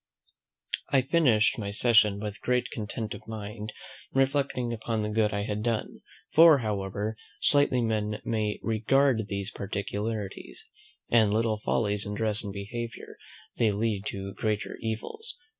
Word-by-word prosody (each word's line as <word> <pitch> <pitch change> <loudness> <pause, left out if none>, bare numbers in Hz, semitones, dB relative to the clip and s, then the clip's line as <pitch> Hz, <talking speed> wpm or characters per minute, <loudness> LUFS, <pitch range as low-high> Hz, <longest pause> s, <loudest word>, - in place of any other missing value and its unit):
I 135 -2 +3
finished 125 -8 +3
my 100 -2 -3
session 105 -1 +4
with 105 -1 -5
great 125 0 0
content 110 0 -4
of - - -11
mind, 105 0 -6 0.4
reflecting 135 -3 +1
upon 110 -1 -2
the 105 - -1
good 105 -1 +2
I 100 0 -1
had 105 0 -2
done; 115 -1 -2 0.3
for, 160 -2 +8
however 105 -2 -2 0.2
slightly 145 -4 +3
men 105 -2 -1
may 110 -2 -1
regard 115 +1 +2
these 100 -1 -3
particularities, 100 +1 -4 0.4
"and 110 -3 +5
little 110 0 +1
follies 105 -1 0
in 105 - -3
dress 105 -1 +1
and 100 - -4
behaviour, 115 +4 -6 0.4
they 110 -3 +3
lead 105 -1 -1
to 95 0 -5
greater 105 -1 -2
evils. 240 - -5
110 Hz, 140 wpm, -28 LUFS, 105-120 Hz, 0.4 s, for